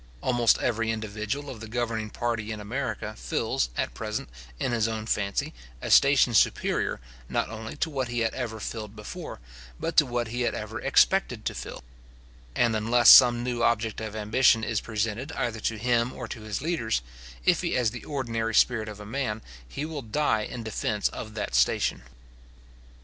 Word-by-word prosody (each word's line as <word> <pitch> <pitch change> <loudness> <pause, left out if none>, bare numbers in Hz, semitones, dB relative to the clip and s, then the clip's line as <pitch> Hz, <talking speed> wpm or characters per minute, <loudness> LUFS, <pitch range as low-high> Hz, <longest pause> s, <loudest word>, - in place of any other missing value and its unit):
Almost 120 -2 +3
every 115 -1 0
individual 110 +5 -3
of 130 -5 -7
the 110 - -8
governing 115 -2 -2
party 115 -2 -2
in 110 - -5
America 110 -1 -4
fills, - - -1
at - - -1
present, - - -4 0.3
in 130 - 0
his 115 -2 +1
own 110 -1 -3
fancy, 100 -3 -1 0.3
a - - -4
station 140 -3 +6
superior, 110 - +2 0.3
not - - -1
only 110 +2 -7
to 160 - 0
what 135 -3 -1
he 120 0 -2
had 115 - 0
ever 115 -4 -4
filled 105 -1 -6
before, 105 - -8 0.4
but 165 - -3
to 150 - +7
what 120 -2 -2
he 120 +2 -3
had 120 - 0
ever - - -5
expected - - +3
to - - -1
fill; - - -7 0.7
and 120 -2 +2
unless 115 +3 +6
some 120 -2 +8
new 120 -1 -2
object 115 -2 +1
of 110 -1 -5
ambition 110 +2 +3
is 110 -1 -1
presented 115 +5 -2
either 115 -2 -2
to 110 +1 -1
him 120 +2 +1
or 125 - -6
to 115 - -7
his 110 +3 -4
leaders, 115 - 0 0.4
if - - +4
he - - -1
has 120 -4 +2
the 125 - -8
ordinary 115 -6 -2
spirit 115 -3 +3
of 105 -1 -9
a 105 - -9
man, 110 -2 -3 0.3
he 145 - -4
will 155 -2 -5
die 115 -1 +1
in 115 +2 -5
defence 105 -1 -1
of 110 -1 -8
that 105 -2 -3
station. - - +2
115 Hz, 180 wpm, -27 LUFS, 110-125 Hz, 0.7 s, some